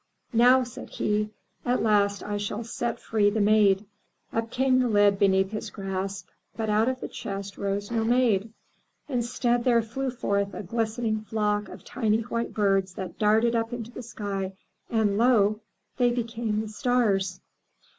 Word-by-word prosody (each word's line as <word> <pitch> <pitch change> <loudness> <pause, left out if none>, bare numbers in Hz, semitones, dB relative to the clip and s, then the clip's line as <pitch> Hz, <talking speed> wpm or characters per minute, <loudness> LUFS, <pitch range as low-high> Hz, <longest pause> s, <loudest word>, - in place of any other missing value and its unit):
"Now/' 250 +2 +6
said 240 - -9
he, 210 0 -1 0.3
"at 245 +1 +1
last 205 -2 +2
I 205 0 -3
shall 205 +2 -3
set 235 +1 -3
free 210 -2 +2
the 215 +2 -1
Maid." 205 -1 +4 0.5
Up 225 0 -1
came 255 +1 +2
the 250 - +2
lid 205 -2 +4
beneath 190 0 +3
his 215 - -4
grasp, 195 0 -4 0.3
but 220 -2 -1
out 220 +3 +3
of 260 0 -3
the - - -3
chest 195 -1 -6
rose 200 +2 -3
no 225 -1 +1
Maid. 225 -3 +2 0.6
Instead, 240 -2 0
there 235 -2 +3
flew 260 +4 -3
forth 200 -5 -1
a - - -5
glistening 220 +1 -1
flock 210 -1 -1
of - - -11
tiny 220 -3 0
white 230 +1 -3
birds 195 -3 +1
that 190 - -7
darted 220 +3 +3
up 230 +1 -1
into 235 -1 -5
the 250 - -7
sky 200 -4 -4 0.4
and 215 -3 +1
lo! 215 -4 +4 0.4
they 245 -2 +4
became 230 -2 -2
the 220 - -6
stars. 210 -5 +1
215 Hz, 165 wpm, -26 LUFS, 200-235 Hz, 0.6 s, Now